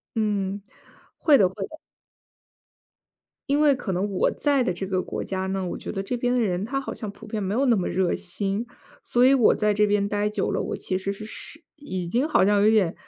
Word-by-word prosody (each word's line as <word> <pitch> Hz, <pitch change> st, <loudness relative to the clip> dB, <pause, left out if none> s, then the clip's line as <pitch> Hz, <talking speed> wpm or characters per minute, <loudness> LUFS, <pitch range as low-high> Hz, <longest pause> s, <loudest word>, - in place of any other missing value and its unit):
嗯， 200 Hz, -2 st, -1 dB, 0.6 s
会 300 Hz, -3 st, +5 dB
的 190 Hz, -4 st, +5 dB
会 195 Hz, +1 st, -6 dB
的。 315 Hz, -, -11 dB, 1.7 s
因 285 Hz, -, +3 dB
为 295 Hz, -2 st, +5 dB
可 205 Hz, -6 st, -4 dB
能 195 Hz, +3 st, -1 dB
我 190 Hz, -, +2 dB
在 285 Hz, -3 st, +1 dB
的 180 Hz, -, -1 dB
这 190 Hz, +2 st, -4 dB
个 185 Hz, -1 st, 0 dB
国 -, -, -5 dB
家 190 Hz, -1 st, -3 dB
呢， 190 Hz, 0 st, -2 dB
我 175 Hz, -, -4 dB
觉 -, -, -6 dB
得 195 Hz, -, -3 dB
这 245 Hz, +5 st, -3 dB
边 245 Hz, +1 st, 0 dB
的 -, -, +2 dB
人 195 Hz, -4 st, 0 dB
他 275 Hz, +3 st, -2 dB
好 -, -, -5 dB
像 215 Hz, -, -5 dB
普 220 Hz, +2 st, -13 dB
遍 215 Hz, -1 st, -3 dB
没 195 Hz, +2 st, -2 dB
有 265 Hz, +4 st, +2 dB
那 240 Hz, -5 st, +4 dB
么 185 Hz, -, -1 dB
热 185 Hz, -1 st, +1 dB
心。 200 Hz, +5 st, -2 dB, 0.4 s
所 245 Hz, +1 st, +2 dB
以 260 Hz, -, +6 dB
我 260 Hz, -5 st, +5 dB
在 210 Hz, -1 st, +1 dB
这 210 Hz, +1 st, +3 dB
边 205 Hz, -1 st, +1 dB
呆 205 Hz, 0 st, 0 dB
久 210 Hz, -, -1 dB
了， -, -, -1 dB
我 -, -, -3 dB
其 185 Hz, -1 st, -2 dB
实 195 Hz, +1 st, -3 dB
是 215 Hz, -, -8 dB
是 300 Hz, +8 st, -7 dB
已 185 Hz, -, -5 dB
经 245 Hz, -, 0 dB
好 245 Hz, -, +4 dB
像 205 Hz, 0 st, +3 dB
有 210 Hz, -, +5 dB
点， 200 Hz, -7 st, +3 dB
205 Hz, 250 characters per minute, -25 LUFS, 190-240 Hz, 1.7 s, 以